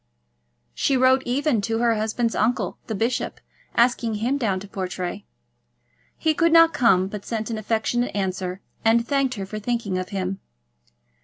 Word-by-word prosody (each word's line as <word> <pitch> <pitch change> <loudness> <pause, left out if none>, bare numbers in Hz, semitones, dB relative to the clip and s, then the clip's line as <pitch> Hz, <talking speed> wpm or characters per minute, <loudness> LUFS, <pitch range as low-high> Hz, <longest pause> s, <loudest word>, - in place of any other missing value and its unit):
She 270 - +1
wrote 260 +1 +4
even 260 -2 +1
to 225 +2 -1
her 235 0 +3
husband's 225 +2 -1
uncle, 235 +3 0
the 220 - -3
bishop, 235 +5 -1 0.4
asking 235 -2 +2
him 235 +6 0
down 200 -7 0
to 205 - -9
Portray. 185 0 -4 0.9
He 315 -1 +1
could 335 +1 +2
not 330 0 +7
come, 190 -6 +3
but 200 0 -7
sent 225 0 -3
an 220 - -2
affectionate 225 +3 -1
answer, 190 -1 -2 0.2
and 230 +1 +3
thanked 275 -2 +1
her 195 -2 -4
for 215 +2 -6
thinking 215 -4 -2
of 185 - -5
him. 190 -1 -3
225 Hz, 160 wpm, -23 LUFS, 200-245 Hz, 0.9 s, not